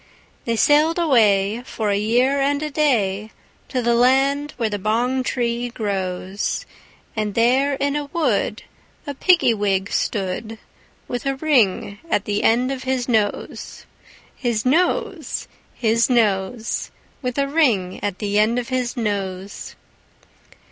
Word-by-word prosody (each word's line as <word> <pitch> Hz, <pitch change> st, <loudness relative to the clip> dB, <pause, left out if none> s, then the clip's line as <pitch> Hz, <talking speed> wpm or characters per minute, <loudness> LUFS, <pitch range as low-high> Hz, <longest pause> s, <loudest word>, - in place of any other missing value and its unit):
They 230 Hz, -, 0 dB
sailed 300 Hz, +7 st, +4 dB
away, 220 Hz, -, +3 dB
for 220 Hz, -5 st, -2 dB
a -, -, +2 dB
year 245 Hz, +7 st, +2 dB
and 285 Hz, +2 st, +1 dB
a 305 Hz, -, -3 dB
day, 220 Hz, -9 st, +1 dB, 0.4 s
To 255 Hz, -2 st, -1 dB
the 235 Hz, 0 st, +2 dB
land 270 Hz, +4 st, +3 dB
where 230 Hz, -, 0 dB
the 205 Hz, -1 st, -3 dB
bong 240 Hz, +6 st, 0 dB
tree 240 Hz, -1 st, -1 dB
grows; 195 Hz, -, -3 dB, 0.5 s
And 215 Hz, -2 st, -2 dB
there 260 Hz, +5 st, +3 dB
in 280 Hz, +1 st, -1 dB
a 295 Hz, -1 st, -2 dB
wood 260 Hz, -8 st, -1 dB, 0.4 s
a 285 Hz, -, -4 dB
Piggy 320 Hz, -4 st, +4 dB
wig 200 Hz, -2 st, -1 dB
stood, 215 Hz, +2 st, -2 dB, 0.5 s
With 245 Hz, +2 st, -4 dB
a 275 Hz, -, 0 dB
ring 235 Hz, -9 st, +1 dB
at 205 Hz, -, +1 dB
the 205 Hz, 0 st, -1 dB
end 245 Hz, +3 st, +2 dB
of 265 Hz, -1 st, -4 dB
his 260 Hz, -2 st, -1 dB
nose, 220 Hz, -4 st, -2 dB, 0.5 s
His 235 Hz, -3 st, -2 dB
nose, 360 Hz, -, 0 dB, 0.3 s
His 230 Hz, +1 st, +2 dB
nose, 220 Hz, -1 st, 0 dB, 0.3 s
With 250 Hz, -1 st, -3 dB
a 280 Hz, 0 st, +1 dB
ring 240 Hz, -, +1 dB
at 200 Hz, -2 st, -2 dB
the 205 Hz, -1 st, 0 dB
end 220 Hz, +3 st, +2 dB
of 245 Hz, +1 st, -3 dB
his 255 Hz, 0 st, -2 dB
nose. 200 Hz, -3 st, -4 dB
235 Hz, 140 wpm, -21 LUFS, 205-275 Hz, 0.5 s, sailed